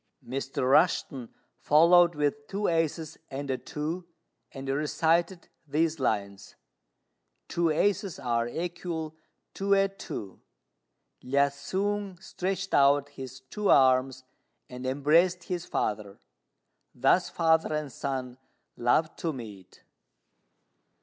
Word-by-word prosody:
'" - - -53
Mr. 135 +1 -3
Rushten 135 -4 +2 0.3
followed 170 +2 +5
with 145 0 -1
two 200 +1 -2
aces 165 -1 -1
and 140 0 -4
a 130 - -1
two, 165 +4 -5 0.4
and 135 0 -8
recited 160 +5 0 0.2
these 155 +2 0
lines: 100 -5 -2 0.9
"Two 170 -1 0
aces 195 +4 0
are 120 -3 -1
equal 165 +1 -4 0.4
to 200 0 +1
a 195 0 +3
two: 110 - -8 0.8
Lu 135 +2 -3
hsiang 190 +7 -3
stretched 190 0 -4
out 140 0 +4
his 130 -2 -9
two 200 +10 -3
arms 130 -1 +4 0.4
and 125 0 -7
embraced 165 +7 +3
his 175 -1 -4
father. 105 -2 -3 0.8
Thus 135 +8 +3
father 160 -1 +2
and 150 -2 -2
son 130 -1 -4 0.4
love 155 +7 +1
to 165 - -2
meet!" 105 - -11
150 Hz, 110 wpm, -28 LUFS, 130-175 Hz, 0.9 s, followed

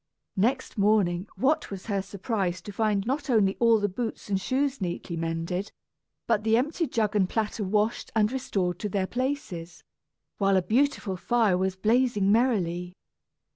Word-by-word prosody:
Next 240 +3 0
morning 200 -3 +2
what 305 +4 +1
was 195 -2 -7
her 200 -3 -1
surprise 195 -2 -2
to 205 - -7
find 205 -1 0
not 270 +3 -2
only 205 -5 +3
all 230 -2 +5
the 205 - +1
boots 220 +2 -5
and 195 -1 0
shoes 270 +2 0
neatly 175 -1 -3
mended, 165 +4 -3 0.5
but 215 -3 +1
the 225 0 +3
empty 305 +6 0
jug 215 -4 0
and 190 -3 +2
platter 220 -1 -1
washed 210 +3 0
and 215 0 +3
restored 195 -9 -2
to 210 - -3
their 195 -1 0
places, 235 -9 -4 0.6
while 195 -1 +3
a 185 - +2
beautiful 235 -4 +1
fire 225 -2 +2
was 190 +1 0
blazing 215 -1 +2
merrily! 180 -7 +1
210 Hz, 160 wpm, -27 LUFS, 190-235 Hz, 0.6 s, all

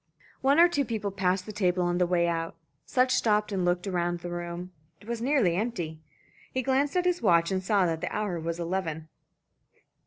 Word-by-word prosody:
One 275 +4 +4
or 345 - +9
two 290 -5 0
people 220 -5 -3
passed 185 -1 0
the 215 - -6
table 185 -3 +1
on 175 0 0
the 180 - +3
way 175 -1 +2
out. 165 -1 -2 0.3
Sutch 255 0 +2
stopped 210 -3 +2
and 190 -2 -1
looked 175 +1 +1
round 175 -2 -1
the 175 0 -6
room. 175 +1 -5 0.3
It 205 - -17
was 235 -1 -3
nearly 245 - +2
empty. 175 -7 -3 0.5
He 260 - -1
glanced 275 +4 +1
at 360 - +1
his 360 -1 +1
watch 170 -4 +3
and 190 0 -1
saw 200 -1 +3
that 165 -2 -1
the - - -3
hour 205 -5 -2
was 165 +1 -4
eleven. 165 -3 -3
185 Hz, 205 wpm, -28 LUFS, 175-230 Hz, 0.5 s, or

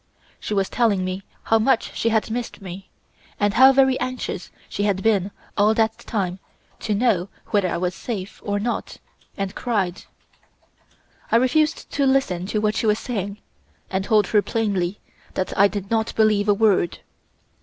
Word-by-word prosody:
She 210 - -3
was 195 -1 +1
telling 210 -6 +1
me 185 +1 -3 0.2
how 225 - +3
much 230 +1 +1
she 230 - +1
had 220 0 0
missed 240 0 -4
me, 190 -1 -9 0.5
and 205 -1 +2
how 260 +4 +8
very 265 -1 +3
anxious 250 -7 -4 0.2
she - - -4
had 200 -2 0
been 205 -4 +2 0.3
all 210 +2 +3
that 225 0 +2
time 190 -4 -3 0.4
to 215 - -1
know 200 -5 +1 0.2
whether 200 -3 +3
I - - -1
was 180 +1 -1
safe 200 -3 -6
or 205 0 -1
not, 235 +3 -3 0.4
and 195 -1 -3
cried. 200 -7 -2 1.3
I - - +4
refused 295 +6 +2
to 280 -1 +1
listen 190 -10 +1
to 215 - -1
what 215 0 +1
she 225 - 0
was 210 0 +3
saying 205 -4 -4 0.5
and 190 0 0
told 215 -1 +4
her 210 - +3
plainly 200 -4 -1 0.4
that 185 - -2
I 200 - +6
did 200 0 -6
not 225 0 0
believe 210 -2 +3
a - - +7
word. 200 -5 +2
210 Hz, 170 wpm, -23 LUFS, 195-230 Hz, 1.3 s, how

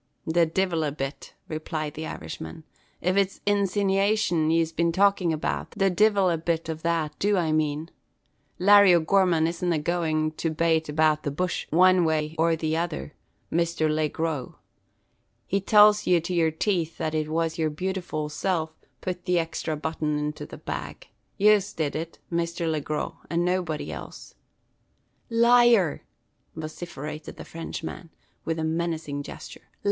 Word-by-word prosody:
"The 165 +1 +3
divil 170 -1 0
a 150 - -1
bit," 135 0 -6
replied 155 -1 -4
the 160 +1 -5
Irishman. 80 - -7 0.4
"If 185 +2 +1
it's 195 -1 +1
insinivation 200 -4 +2
yez 165 0 +2
be 170 +1 +1
talkin' 195 -1 +3
about, 155 -1 -2
the 195 -1 +3
divil 200 -1 +3
a 165 - -1
bit 165 0 -1
ov 160 0 -7
that 165 -2 -1
do 205 0 +2
I 165 -3 +1
mane. 155 +1 -1 0.7
Larry 200 -1 +7
O'Gorman 170 -1 +3
isn't 170 +1 -1
agoin' 155 -1 0
to 165 - -1
bate 160 0 +1
about 155 0 +2
the 145 - -2
bush 180 +5 -2
wan 185 +2 +5
way 155 -1 0
or 165 0 +3
the 160 -1 -2
tother, 165 -2 -3 0.4
Misther 170 -1 +1
Laygrow. 155 -2 -2 0.9
He 195 - 0
tells 210 +1 +5
ye 180 -1 +5
to 170 +3 -4
yer 165 -2 +3
teeth 165 0 -1
that 155 - -2
it 155 -1 -1
was 165 +1 -1
yer 160 -1 +2
beautiful 175 -2 -3
self 160 +1 -2 0.3
putt 180 -1 -4
the 180 -1 +1
exthra 160 -2 -2
button 155 -1 -2
into 150 0 -4
the - - -10
bag, - - -6 0.3
yez 205 -1 +4
did 155 -3 -2
it, 165 +1 -5
Misther 170 0 -1
Laygrow, 155 +1 -2
and 170 +1 0
nobody 180 -4 -1
else." - - -9 1.0
"Liar!" 235 -6 +4 0.5
vociferated 155 -1 -7
the - - -8
Frenchman, 165 +1 -7 0.4
with 165 0 -1
a 160 - -2
menacing 160 -3 -2
gesture. - - -10
165 Hz, 150 wpm, -26 LUFS, 155-180 Hz, 1.0 s, Larry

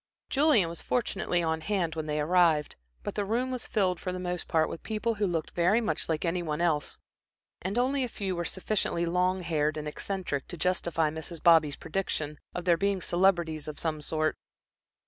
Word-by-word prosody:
Julian 275 - +4
was 170 0 -5
fortunately 190 -7 0
on 160 -1 0
hand 175 -2 0
when 160 -1 -4
they 150 0 -1
arrived, 160 -1 +3 0.3
but - - -3
the 205 - -1
room 240 +6 0
was 250 -2 -3
filled 190 -6 +1
for 185 - -3
the 180 - -4
most 180 -1 -3
part 160 -1 +2
with - - -6
people 220 +1 -1
who 205 -2 0
looked 165 -3 -2
very 180 +6 +3
much 220 -6 -2
like 160 +1 0
any 175 +1 0
one 155 -2 -2
else, 160 -4 0 0.6
and 195 +5 -2
only 260 +2 +2
a 250 - -2
few 195 -4 -3
were 175 - -2
sufficiently 185 -2 -1
long 180 +2 +1
haired 155 -2 0
and 150 0 -4
eccentric 160 -3 -3
to 175 - -7
justify 165 -3 +1
Mrs. 160 +1 -7
Bobby's 160 -4 +6
prediction 155 -4 -3 0.2
of 175 - -4
their 170 -2 +4
being 200 +1 +1
celebrities 175 -4 +1
of 150 - -6
some 155 -2 -2
sort. 155 0 0
175 Hz, 195 wpm, -29 LUFS, 160-195 Hz, 0.6 s, Bobby's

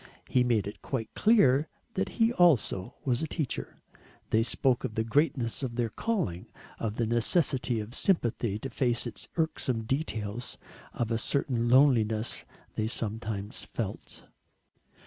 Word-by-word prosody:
He 125 - +3
made 115 -5 +2
it 100 - -7
quite 120 -5 -4
clear 160 - +4 0.3
that 190 - -1
he 230 0 +4
also 145 - +3
was 125 -3 +1
a 160 - -1
teacher. 155 -3 -4 0.5
They 110 - +4
spoke 125 +2 +1
of 110 - -4
the 110 - +1
greatness 125 -1 +1
of 125 -3 -3
their 120 -1 0
calling, 180 - -2 0.3
of 110 -2 -2
the 115 - 0
necessity 120 +1 +1
of 105 +2 -6
sympathy 120 - +1
to 135 +4 -6
face 120 0 +1
its - - -3
irksome 135 -8 0
details, 115 -3 -2 0.3
of 115 -1 -2
a 115 - +1
certain 120 -3 0
loneliness 120 -5 +3 0.3
they 110 - -1
sometimes 110 -3 -4
felt. - - -6
120 Hz, 145 wpm, -29 LUFS, 110-140 Hz, 0.5 s, clear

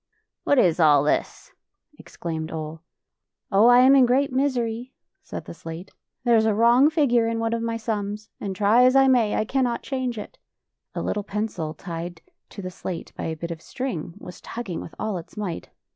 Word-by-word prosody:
"What 285 - +3
is 180 -8 +3
all 150 -3 +5
this?" 150 - -1 0.5
ex - - -15
claimed 160 -1 -4
Ole. 155 0 -6 0.4
" - - -53
Oh, 205 +4 +5
I 245 0 +7
am 265 +2 +7
in 260 -2 +6
great 265 +2 +2
misery," 250 -2 -1 0.3
said - - -8
the - - -8
slate. 165 +3 -9 0.2
" - - -59
There 240 -1 +4
is 220 0 +4
a 215 - +2
wrong 240 +6 +5
figure 255 -8 +2
in 230 0 -1
one 225 0 -1
of 230 - -1
tny 230 0 -2
sums, 210 -1 -4
and 195 -2 -4
try 210 +5 +4
as 255 +1 +5
1 270 -1 +6
maj^ 230 -5 +3
I - - 0
cannot 250 0 0
change 255 -3 -3
it." 210 - -8 0.6
A - - -2
little 210 - -2
pencil, 200 -7 -3
tied 170 0 -7 0.3
to 200 - -9
the 185 - -5
slate 180 -1 -6
by - - -5
a 160 - -2
bit 170 +2 -5
of 165 -1 -7
string, 180 - -5
was 180 -3 -11
tugging 225 -8 -5
with - - -10
all 215 -4 -2
its 165 - -14
might. 190 -6 -4
220 Hz, 205 wpm, -24 LUFS, 175-245 Hz, 0.6 s, I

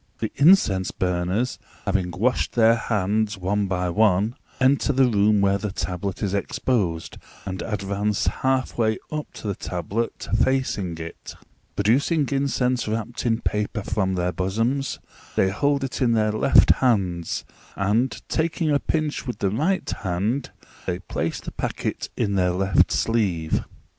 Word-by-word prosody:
The - - -3
incense 140 - +5
burners, 90 +6 -1 0.3
having 95 -3 0
washed 110 +9 0
their 115 -1 +5
hands, 105 -1 0
one 100 +2 0
by 90 -1 -1
one, 105 +2 +3 0.3
enter 135 +2 +3
the 135 -1 +4
room 105 -3 +3
where 100 0 +2
the 105 -1 -3
tablet 95 +1 -4
is 100 -2 -1
exposed, 95 - -1 0.3
and 95 -2 -4
advance 100 -1 -1 0.2
half 130 -2 0
way 110 -1 +2
up 150 -1 -4
to - - -7
the 100 - 0
tablet, 95 +6 -3 0.2
facing 105 -10 0
it; 85 0 -8 0.4
producing 140 - +2
incense 130 -3 0
wrapped 115 +3 -3
in 115 0 +1
paper 105 +1 -1
from 95 -2 0
their 90 0 0
bosoms, 115 +10 -1 0.4
they 95 - +3
hold 140 +6 +1
it 135 +1 -4
in 120 -2 +3
their 110 -1 +2
left 110 +5 +5
hands, 95 -9 +1 0.3
and, 110 +6 0
taking 160 0 0
a 145 - +3
pinch 155 -3 -2
with 125 - -3
the 100 -2 0
right 165 - 0
hand, 105 +8 -1 0.4
they 90 -1 0
place 90 - -3
the - - -7
packet - - -3
in 100 - 0
their 90 -2 +2
left 95 +2 +2
sleeve. 95 -9 0
105 Hz, 150 wpm, -24 LUFS, 95-125 Hz, 0.4 s, incense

